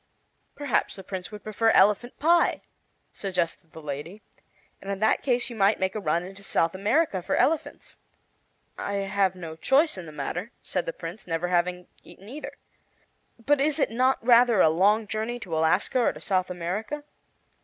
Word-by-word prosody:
"Perhaps 285 Hz, -6 st, -1 dB
the 195 Hz, -, -10 dB
Prince 185 Hz, 0 st, -6 dB
would 210 Hz, -1 st, -9 dB
prefer 220 Hz, +1 st, +1 dB
elephant 210 Hz, +4 st, +3 dB
pie," 335 Hz, +2 st, +3 dB, 0.5 s
suggested 175 Hz, -4 st, -3 dB
the 160 Hz, -, -11 dB
lady, 150 Hz, +8 st, -6 dB, 0.6 s
"and 195 Hz, -, -5 dB
in 200 Hz, -, -2 dB
that 220 Hz, +1 st, +2 dB
case 245 Hz, -2 st, +1 dB
you 240 Hz, -, -8 dB
might 200 Hz, 0 st, +3 dB
make 190 Hz, 0 st, 0 dB
a 215 Hz, -, -3 dB
run 170 Hz, -2 st, 0 dB
into 190 Hz, +2 st, -10 dB
South 165 Hz, -4 st, 0 dB
America 205 Hz, -, +1 dB
for 175 Hz, -, -1 dB
elephants." 320 Hz, 0 st, -1 dB, 0.8 s
"I 200 Hz, -, -3 dB
have 195 Hz, -1 st, 0 dB
no 165 Hz, -3 st, -7 dB
choice 270 Hz, -, +2 dB
in 170 Hz, -, -8 dB
the -, -, -9 dB
matter," 180 Hz, +8 st, -5 dB
said 180 Hz, -, -3 dB
the -, -, 0 dB
Prince, 175 Hz, +5 st, -8 dB
"never 165 Hz, +1 st, -1 dB
having 180 Hz, 0 st, 0 dB, 0.2 s
eaten 195 Hz, -, -15 dB
either. 295 Hz, +5 st, -7 dB, 0.9 s
But 290 Hz, -1 st, +3 dB
is 300 Hz, +1 st, +2 dB
it 280 Hz, -, +1 dB
not 255 Hz, +3 st, +2 dB
rather 240 Hz, -3 st, +6 dB
a 160 Hz, -, +6 dB
long 205 Hz, +7 st, +3 dB
journey 220 Hz, +3 st, -3 dB
to 170 Hz, -6 st, -4 dB
Alaska 160 Hz, +10 st, +2 dB
or 240 Hz, -, +2 dB
to -, -, -11 dB
South 185 Hz, -2 st, 0 dB
America?" 190 Hz, -, -4 dB
195 Hz, 175 wpm, -26 LUFS, 180-235 Hz, 0.9 s, rather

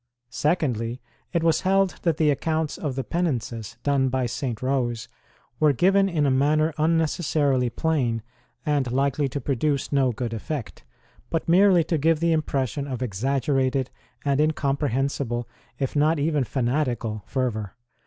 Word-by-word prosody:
Secondly, 125 Hz, -7 st, 0 dB, 0.3 s
it 170 Hz, -2 st, 0 dB
was 165 Hz, -1 st, +3 dB
held 195 Hz, 0 st, +2 dB
that 165 Hz, -3 st, +1 dB
the 155 Hz, -2 st, +3 dB
accounts 160 Hz, +1 st, -1 dB
of 145 Hz, -5 st, -3 dB
the 135 Hz, -, -2 dB
penances 125 Hz, -, -2 dB
done 140 Hz, -2 st, +2 dB
by 130 Hz, 0 st, 0 dB
St. 120 Hz, -1 st, -3 dB
Rose 125 Hz, -4 st, -1 dB, 0.5 s
were 150 Hz, -2 st, +4 dB
given 195 Hz, +7 st, +3 dB
in 155 Hz, -5 st, +1 dB
a 140 Hz, -, +3 dB
manner 155 Hz, +4 st, +2 dB
unnecessarily 150 Hz, -5 st, +1 dB
plain 120 Hz, -5 st, 0 dB, 0.4 s
and 145 Hz, -5 st, +1 dB
likely 140 Hz, +2 st, +1 dB
to 140 Hz, -, -3 dB
produce 140 Hz, +2 st, -1 dB
no 135 Hz, -3 st, +3 dB
good 115 Hz, 0 st, -4 dB
effect, 115 Hz, -, -5 dB, 0.5 s
but 165 Hz, -, -2 dB
merely 180 Hz, 0 st, +5 dB
to 165 Hz, 0 st, -1 dB
give 160 Hz, +2 st, +3 dB
the 170 Hz, 0 st, +2 dB
impression 140 Hz, -3 st, -1 dB
of 130 Hz, -2 st, -3 dB
exaggerated 130 Hz, +4 st, 0 dB, 0.3 s
and 140 Hz, 0 st, +2 dB
incomprehensible, 135 Hz, -5 st, 0 dB, 0.3 s
if 135 Hz, 0 st, -2 dB
not 155 Hz, +3 st, +3 dB
even 150 Hz, -1 st, +1 dB
fanatical, 120 Hz, -4 st, -1 dB
fervour. 110 Hz, -7 st, -2 dB
140 Hz, 145 wpm, -24 LUFS, 125-155 Hz, 0.5 s, merely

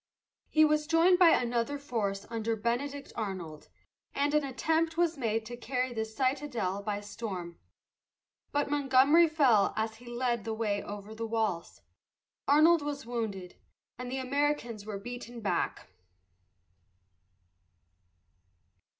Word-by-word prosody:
He 310 Hz, 0 st, +5 dB
was 300 Hz, 0 st, +1 dB
joined 345 Hz, +3 st, +4 dB
by 355 Hz, -2 st, +8 dB
another 245 Hz, +1 st, +1 dB
force 215 Hz, -8 st, -3 dB
under 225 Hz, 0 st, -1 dB
Benedict 275 Hz, +6 st, -3 dB
Arnold, 185 Hz, -8 st, -5 dB, 0.5 s
and 285 Hz, +1 st, +1 dB
an 300 Hz, -1 st, +3 dB
attempt 320 Hz, +5 st, 0 dB
was 340 Hz, -1 st, +2 dB
made 225 Hz, -5 st, -1 dB
to 240 Hz, +2 st, -6 dB
carry 250 Hz, +1 st, -2 dB
the 220 Hz, -1 st, -2 dB
citadel 245 Hz, -5 st, -1 dB
by 205 Hz, 0 st, -3 dB
storm. 190 Hz, -5 st, -6 dB, 0.9 s
But 290 Hz, 0 st, 0 dB
Montgomery 285 Hz, +3 st, +5 dB
fell 260 Hz, -10 st, +4 dB
as 220 Hz, 0 st, -2 dB
he 240 Hz, +1 st, -15 dB
led 240 Hz, -2 st, -1 dB
the 225 Hz, -1 st, -3 dB
way 210 Hz, -3 st, -1 dB
over 205 Hz, +1 st, -8 dB
the 225 Hz, +1 st, -4 dB
walls, 220 Hz, -6 st, -2 dB, 0.7 s
Arnold 310 Hz, +3 st, +6 dB
was 290 Hz, -3 st, -4 dB
wounded, 215 Hz, -7 st, -4 dB, 0.4 s
and 250 Hz, 0 st, -5 dB
the 265 Hz, -, -2 dB
Americans 260 Hz, -5 st, -1 dB
were 210 Hz, -2 st, -4 dB
beaten 240 Hz, +2 st, -8 dB
back. 210 Hz, -3 st, -2 dB
240 Hz, 125 wpm, -30 LUFS, 220-285 Hz, 0.9 s, by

